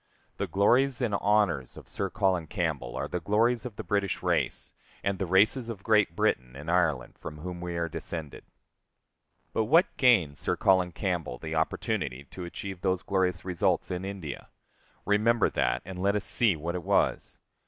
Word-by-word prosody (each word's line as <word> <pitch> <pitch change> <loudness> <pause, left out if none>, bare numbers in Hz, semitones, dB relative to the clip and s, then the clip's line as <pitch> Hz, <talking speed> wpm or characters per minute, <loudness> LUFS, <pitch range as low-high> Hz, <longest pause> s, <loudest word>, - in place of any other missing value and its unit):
The - - -2
glories 125 +6 +3
and 120 -5 0
honors 100 -10 +1
of - - -12
Sir - - -3
Colin 90 -4 0
Campbell 80 - -2
are - - -2
the 90 - -3
glories 115 +7 +1
of 115 - -11
the - - -6
British 100 -2 -1
race, - - -1 0.3
and 100 -1 -1
the 95 - -1
races 110 +7 +3
of 100 -4 -7
Great 105 -6 +3
Britain 65 -4 0
and 75 +5 -5
Ireland, 80 -8 0
from 75 - -7
whom 90 +2 -6
we 90 -1 -4
are 85 0 0
descended. 80 -2 -5 1.1
But 110 - +1
what 165 - +4
gained 95 - +4
Sir - - -1
Colin 95 -2 +3
Campbell 85 -5 -2
the 80 +3 -6
opportunity 70 -4 -1
to 90 - -7
achieve 95 +1 -7
those 95 -1 0
glorious 90 -3 0
results 90 0 0
in 90 0 -3
India? 95 -7 -6 0.6
Remember 110 +2 +3
that, - - 0
and 90 0 -7
let 100 +2 +2
us 105 - 0
see 110 -7 +3
what 80 +3 -4
it 90 - -3
was. - - +1
95 Hz, 175 wpm, -28 LUFS, 85-105 Hz, 1.1 s, what